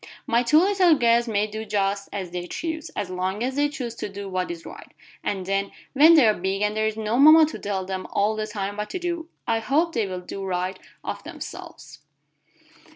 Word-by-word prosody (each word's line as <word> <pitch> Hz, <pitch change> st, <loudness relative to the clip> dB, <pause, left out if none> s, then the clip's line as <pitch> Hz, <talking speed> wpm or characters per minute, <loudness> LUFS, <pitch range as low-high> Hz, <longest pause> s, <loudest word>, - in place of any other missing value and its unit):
"My 235 Hz, +1 st, +2 dB
two 245 Hz, +5 st, +4 dB
little 370 Hz, -1 st, +5 dB
girls 235 Hz, -2 st, +3 dB
may 210 Hz, -2 st, +1 dB
do 215 Hz, +1 st, -6 dB
just 200 Hz, -1 st, -1 dB
as 185 Hz, -3 st, -5 dB
they 175 Hz, 0 st, -5 dB
choose, 320 Hz, -, -4 dB
as 185 Hz, -, -3 dB
long 185 Hz, +4 st, -2 dB
as 260 Hz, +1 st, -2 dB
they 290 Hz, +1 st, +2 dB
choose 255 Hz, -6 st, -5 dB
to -, -, -4 dB
do 200 Hz, 0 st, -7 dB
what 185 Hz, -1 st, -2 dB
is 170 Hz, -1 st, -7 dB
right, -, -, -11 dB, 0.3 s
and 195 Hz, -2 st, -2 dB
then 195 Hz, +1 st, -1 dB, 0.2 s
when 310 Hz, +5 st, +7 dB
they 280 Hz, -8 st, +6 dB
are 215 Hz, -, +5 dB
big 195 Hz, +2 st, -2 dB
and 210 Hz, 0 st, 0 dB
there 215 Hz, 0 st, +1 dB
is 220 Hz, 0 st, -3 dB
no 220 Hz, +3 st, -1 dB
mama 310 Hz, +2 st, +9 dB
to 310 Hz, -, -6 dB
tell 195 Hz, -2 st, -3 dB
them 190 Hz, 0 st, -4 dB
all 210 Hz, +2 st, +1 dB
the 215 Hz, 0 st, -3 dB
time 205 Hz, -1 st, -4 dB
what 210 Hz, 0 st, -3 dB
to -, -, -3 dB
do, 345 Hz, -2 st, -4 dB, 0.2 s
I 225 Hz, 0 st, +1 dB
hope 310 Hz, +8 st, +1 dB
they 225 Hz, -5 st, 0 dB
will 185 Hz, -1 st, -5 dB
do 195 Hz, +2 st, -7 dB
right 185 Hz, 0 st, -2 dB, 0.2 s
of -, -, -5 dB
themselves." -, -, -9 dB
215 Hz, 220 wpm, -24 LUFS, 195-275 Hz, 0.3 s, mama